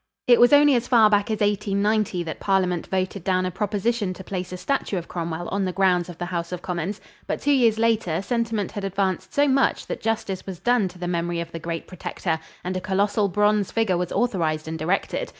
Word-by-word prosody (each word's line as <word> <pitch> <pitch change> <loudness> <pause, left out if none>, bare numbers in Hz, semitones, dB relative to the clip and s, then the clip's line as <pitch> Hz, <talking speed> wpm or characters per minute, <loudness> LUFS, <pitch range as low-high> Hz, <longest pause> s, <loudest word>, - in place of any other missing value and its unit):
It 240 -1 +6
was 245 +2 +6
only 290 0 +7
as 245 -1 +1
far 225 -4 +5
back 205 0 +2
as 215 -1 -2
1890 205 -2 +1
that 160 -2 -6
Parliament 185 -3 0
voted 185 0 -2
down 185 0 +1
a 185 - -2
proposition 205 0 -1
to 190 - -9
place 185 -1 -5
a 180 - -5
statue 195 +1 -1
of 170 - -5
Cromwell 170 0 -4
on 200 0 -1
the 185 - -1
grounds 180 -2 +2
of 175 - -9
the 175 - -3
House 170 -1 -4
of 180 -1 -5
Commons; 180 +3 -3 0.3
but - - -2
two 290 - +1
years 235 -5 +4
later 225 -7 +1
sentiment 230 -3 -1
had 205 - -5
advanced 190 -1 -1
so 285 +1 +3
much 275 0 +2
that - - -5
justice 210 -4 -2
was 190 -2 -5
done 240 -5 +2
to 180 0 -11
the 175 0 -4
memory 170 0 -1
of 170 0 -5
the 165 - -6
great 165 0 -4
Protector 170 -2 -3 0.2
and 185 +1 -3
a 185 - -2
colossal 200 +2 +1
bronze 210 +1 +2
figure 225 -5 +1
was 180 0 -2
authorized 165 -10 0
and 160 0 -5
erected. 180 +5 -1
190 Hz, 220 wpm, -24 LUFS, 175-215 Hz, 0.3 s, only